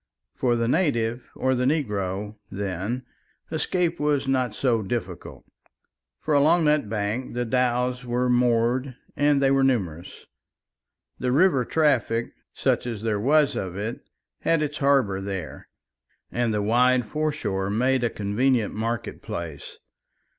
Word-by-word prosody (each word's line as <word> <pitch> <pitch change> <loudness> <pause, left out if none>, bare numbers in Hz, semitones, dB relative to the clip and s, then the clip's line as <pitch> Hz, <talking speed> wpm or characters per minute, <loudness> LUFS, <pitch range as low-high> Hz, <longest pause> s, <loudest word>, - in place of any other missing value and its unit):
For 120 -2 +1
the 115 0 0
native 120 -6 0
or 130 0 +1
the 125 0 0
negro, 105 - -1
then, 100 +6 -3 0.5
escape 170 +1 0
was 145 -2 +1
not 130 -3 0
so 120 -4 +1
difficult. 95 -4 -5 0.7
For 155 - -1
along 155 +4 +4
that 150 -7 +2
bank 110 +4 -3
the 120 0 -1
dhows 125 +1 0
were 125 +1 0
moored 125 +1 +2 0.2
and 145 -1 +3
they 135 - +4
were 135 0 +3
numerous; 95 -10 -1 0.9
the 125 0 0
river 140 -2 +4
traffic, 120 -7 +1 0.2
such - - 0
as 110 -3 -5
there 110 -2 0
was 145 +5 +3
of 90 -2 -4
it, 110 +4 -4 0.4
had 165 -2 +1
its 150 0 -4
harbour 135 -9 +2
there, 95 -5 -6 0.6
and 120 -1 0
the 105 -1 0
wide 125 +3 +3
foreshore 105 -8 -2
made 125 +4 +1
a 120 - +2
convenient 110 +3 0
market 115 +2 -3
place. 80 -4 -7
125 Hz, 135 wpm, -25 LUFS, 105-135 Hz, 0.9 s, along